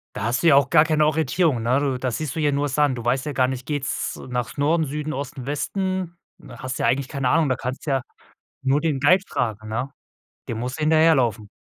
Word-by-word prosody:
Da - - -4
hast 120 +4 0
du - - +3
ja 150 - +7
auch 140 -2 +3
gar 160 -2 +6
keine 155 -2 +2
Orientierung, 155 -2 +1
ne, 125 +4 +2
du, 135 -3 -1
da 130 - -1
siehst 140 +3 -4
du - - -3
hier 150 -2 +2
nur 145 +1 0
Sand, 145 -1 +1
du 120 - -7
weißt 130 +4 0
ja 150 - -3
gar 130 -1 +2
nicht, 130 -1 -5
geht's 145 -1 -3
nach 125 +1 -3
Norden, 155 +3 +2
Süden, 150 +2 -4
Osten, 135 -2 -6
Westen? 185 +4 -2 0.2
Du - - -15
hast 130 0 -5
ja - - +2
eigentlich 135 +1 +1
keine 135 -3 -1
Ahnung, 155 +2 +3
da 130 - +1
kannst 130 +1 -5
ja 135 -3 +1 0.6
nur 135 +2 +2
den 155 -5 0
Guide 180 +7 +5
fragen, 110 -3 -3
ne? 115 +5 -2 0.6
Dem 115 - -3
musst 125 +4 -4
du - - -5
hinterherlaufen. 150 -9 +3
140 Hz, 230 wpm, -23 LUFS, 125-155 Hz, 0.6 s, ja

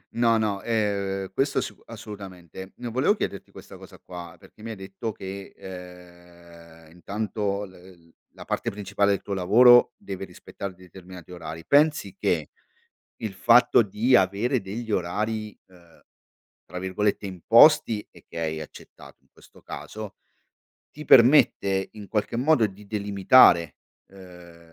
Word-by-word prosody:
No, 115 -1 +3
no, 105 -3 -1
ehm, 100 -4 -2
questo 135 +6 0
sic - - -7
assolutamente. 95 -5 -10
Ehm, 120 -1 -6
volevo 135 - +2
chiederti 100 - -5
questa - - -13
cosa - - -15
qua 85 -2 -10
perché 110 - -18
mi 115 - -6
hai - - -6
detto 95 +3 -6
che 95 0 -9
ehm 85 -3 -14
intanto 100 +2 -4
l 90 -3 -18 0.2
la - - -11
parte - - -3
principale 100 0 -1
del 100 - -1
tuo 100 - -5
lavoro 120 +7 +6
deve 95 0 -7
rispettare 95 +2 -9
determinati 90 -1 -14
orari, 80 -2 -8
pensi 145 -9 +2
che 80 -4 -1 0.7
il 110 -3 -4
fatto 115 +4 +4
di 110 +5 +2
avere 100 +7 +1
degli 110 +4 -7
orari, 105 +3 -3
ehm, 85 -2 -22 0.6
tra 90 - -8
virgolette 100 +2 -2
"imposti" 110 - +4
e - - -19
che - - -11
hai 80 -1 -3
accettato 75 - -13
in - - -36
questo - - -20
caso, 110 -2 -9 0.8
ti 150 +1 -10
permette 115 -8 +4
in 105 -2 -11
qualche 105 +2 -2
modo 130 -1 +3
di 100 +1 -14
delimitare 100 - +4 0.4
ehm 90 -3 -14
100 Hz, 140 wpm, -25 LUFS, 90-110 Hz, 0.8 s, lavoro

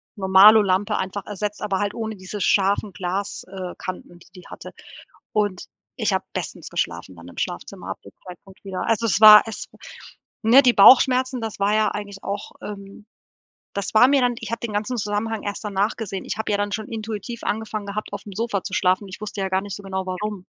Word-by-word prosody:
Normalo-Lampe 195 0 +5
einfach 190 0 -4
ersetzt, 210 0 -5
aber 200 -3 -1
halt 205 0 -1
ohne 220 -1 -4
diese 190 +2 -8
scharfen 200 +2 +2
Glas 195 +2 -4
äh, 185 -1 -7
Kanten, 180 -1 -8
die - - -19
die 180 - -12
hatte - - -10 0.6
und 205 -4 0 0.3
ich - - 0
habe - - -1
bestens - - -6
geschlafen 85 +2 -3
dann 85 0 -13
im - - -16
Schlafzimmer - - -5
ab - - -6
dem - - -13 0.2
Zeitpunkt 185 +2 -13
wieder. 190 -1 -4
Also 230 0 +1
es 200 0 +1
war 215 -1 +11
es 225 - -6
w - - -19 0.7
ne, 235 +5 +7
die 250 -2 +5
Bauchschmerzen 255 +3 +6
das 225 -3 -5
war 200 +1 +2
ja 215 0 +3
eigentlich 200 -1 -7
auch, 200 +1 -5
ähm 200 0 -9 0.7
das 200 0 -4
war 225 +3 +7
mir 275 0 +3
dann 245 -1 +2
ich 225 - -7
habe 230 - -2
den 230 -3 -4
ganzen 215 +4 -2
Zusammenhang 210 +1 -2
erst 205 +1 -5
danach 205 +1 -1
gesehen. 195 -4 -5
Ich - - -4
habe 220 - -2
ja 205 - +2
dann 205 0 -2
schon 215 -1 -4
intuitiv 225 +1 -6
angefangen 215 -1 -3
gehabt, 210 +2 -5
aufm 205 0 -7
Sofa 205 -2 -2
zu - - -7
schlafen. 185 +2 +1
Ich 185 - -10
wusste 210 -1 -5
ja 190 - -1
gar 190 0 +1
nicht 200 -1 -6
so 205 - -10
genau, 190 -1 -4
warum, 185 +1 -4
205 Hz, 210 wpm, -22 LUFS, 190-220 Hz, 0.7 s, war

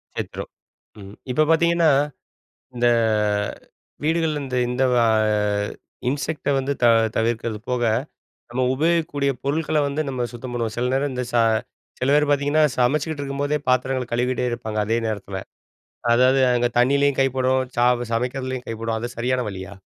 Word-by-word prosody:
செத்துடும். - - -5 0.5
ம் 100 +1 -11 0.2
இப்ப 155 +4 +3
பாத்தீங்கன்னா, 170 -1 +4 0.8
இந்த 120 0 +2 1.2
வீடுகள்ல 160 -1 0
இந்த 130 -1 -3
இந்த 125 +2 0 0.2
ஆ - - +3 1.0
இன்செக்ட்ட 145 +1 -2
வந்து 135 +1 -2
த - - +6 0.3
தவிர்க்கிறது 115 -1 -1
போக, 125 -1 0 0.7
நம்ம 125 +2 -1
உபயோகிக்கக்கூடிய 155 -2 +1
பொருட்கள்ல 155 +2 0
வந்து 145 +2 -1
நம்ம 125 -2 -2
சுத்தம் 120 +1 -7
பண்ணுவோம். 115 -2 -2
சில 120 - 0
நேரம் 140 +1 0
இந்த 125 0 -2
ச - - +1 0.6
சில 130 +2 +1
பேர் 150 0 +4
பாத்தீங்கன்னா 145 +2 +2
சமச்சிட்டு 145 +4 +1
இருக்கும்போதே 140 +1 -1
பாத்திரங்கள்ல 130 0 +1
கழுவிகிட்டே 125 +1 0
இருப்பாங்க. 110 -2 -4
அதே 115 +1 +1
நேரத்தில, 100 -3 -4 0.8
அதாவது 130 +2 +4
அங்க 120 0 +2
தண்ணீயிலயும் 140 +2 +3
கைப்படும், 130 0 +2 0.2
சா 120 - +4 0.3
சமைக்கிறதுலயும் 130 +1 -2
கைப்படும், 115 0 -3
அது 120 +2 -4
சரியான 125 +1 0
வழியா? 95 0 -7
130 Hz, 135 wpm, -22 LUFS, 120-145 Hz, 1.2 s, த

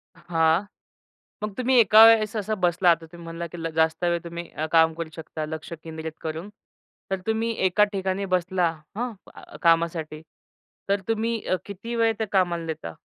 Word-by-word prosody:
हां. 170 +1 +1 0.8
मग 210 -1 -3
तुम्ही 255 +1 +2
एका 220 0 +8
वेळेस 225 -1 +5
असा 215 +1 -1
बसला, 180 -1 +2
आता 165 0 0
तुम्ही 170 -1 -11
म्हणाला, 165 +1 -5
की 175 - -10
ल 165 - -1
जास्त 160 +1 +1
वेळ 170 0 +1
तुम्ही 170 0 -7
अ, 155 - -4
काम 160 -1 +5
करू 165 0 -5
शकता, 160 -1 -6
लक्ष 160 +2 -7
केंद्रित 160 -1 -6
करून. 160 +5 -5 0.6
तर 190 - 0
तुम्ही 225 +1 0
एका 195 +3 +4
ठिकाणी 190 0 -1
बसला 180 -1 +1 0.3
हं, 245 0 -2
क - - -13
कामासाठी. 165 -2 +1 0.7
तर 200 0 +2
तुम्ही 225 +1 0
अ, - - +2
किती 205 +4 -6
वेळ 225 -1 +3
त्या 220 - -1
कामाला 175 -3 +1
देता? 85 - -5
175 Hz, 175 wpm, -25 LUFS, 165-210 Hz, 0.8 s, एका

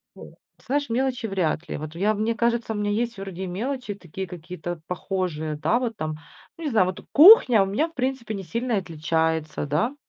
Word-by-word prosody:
ты - - -12 0.3
знаешь, 285 0 -1
мелочи 250 0 -1
вряд 175 -4 -1
ли. - - -3
Вот 155 +2 -7
я 205 +5 +2
мне 215 +2 -1
кажется, 235 -1 0
у - - -5
меня 205 0 -1
есть 235 +1 -1
вроде 190 -1 -6
и - - -4
мелочи 235 +4 -3
такие 190 0 -7
какие-то 175 -1 -7
похожие, 180 -5 -3
да, 220 +10 +1
вот 235 -3 -3
там, 155 0 -3 0.4
ну, 335 - -9
не - - 0
знаю, 185 -5 +4
вот 185 - -6
кухня 290 - +8
у - - -1
меня, 260 +12 0
в 330 - -18
принципе, 255 -3 -2
не 195 -1 -5
сильно 230 +8 -2
и - - +3
отличается, 160 -2 -1
да? 170 - 0
200 Hz, 210 wpm, -24 LUFS, 170-235 Hz, 0.4 s, кухня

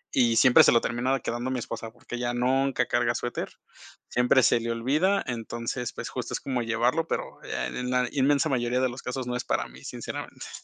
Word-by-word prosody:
y 115 -2 +4
siempre 130 -1 +7
se - - +6
lo 115 - +5
terminaba 125 +3 0
quedando 120 +2 -3
mi 130 - -1
esposa, 115 -1 -6
porque 120 - -9
ella 120 0 -2
nunca 130 +1 +2
carga 120 0 +1
suéter, 120 - -3 0.6
siempre 125 +2 +4
se 115 - +4
le 115 0 -2
olvida. 150 +12 +1
Entonces, 120 0 -4
pues, - - -6
justo, - - -5
es - - -2
como 130 -3 -1
llevarlo, 120 +8 +1
pero, - - -4
eh, - - -3
en 125 0 -3
la 125 0 +2
inmensa 140 +1 +2
mayoría 125 -2 +1
de 130 - +2
los 125 +2 -8
casos 125 0 -3
no 125 - -2
es 125 - -2
para - - 0
mí, - - -15
sinceramente. - - -7
125 Hz, 210 wpm, -27 LUFS, 120-130 Hz, 0.6 s, siempre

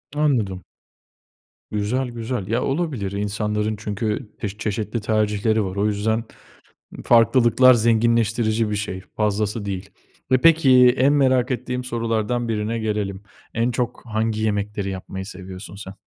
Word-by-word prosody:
Anladım. 115 -12 0 1.1
Güzel, 105 +5 -1
güzel. 115 -3 -4
Ya 115 +3 0
olabilir. 135 - -2
İnsanların 105 +1 -1
çünkü 105 +2 -3
pek 105 -1 -5
çeşitli 110 +1 -2
tercihleri 110 0 +1
var. 95 0 -5
O 100 +1 0
yüzden 110 +2 0 0.8
farklılıklar 120 +2 +5
zenginleştirici 115 -1 +2
bir 105 - -1
şey, 100 -2 -4
fazlası 105 0 -1
değil 100 -1 -5 0.4
ve 130 - +6
peki, 130 -6 +6
en 135 +3 +4
merak 130 -3 +3
ettiğim 125 0 -3
sorulardan 115 0 -1
birine 110 +1 -1
gelelim. 105 -3 -3 0.3
En 115 +2 +1
çok 120 0 -3
hangi 110 -1 -1
yemekleri 105 -1 -1
yapmayı 95 0 -6
seviyorsun 95 -1 -9
sen? 100 -1 -9
110 Hz, 125 wpm, -22 LUFS, 105-120 Hz, 1.1 s, ve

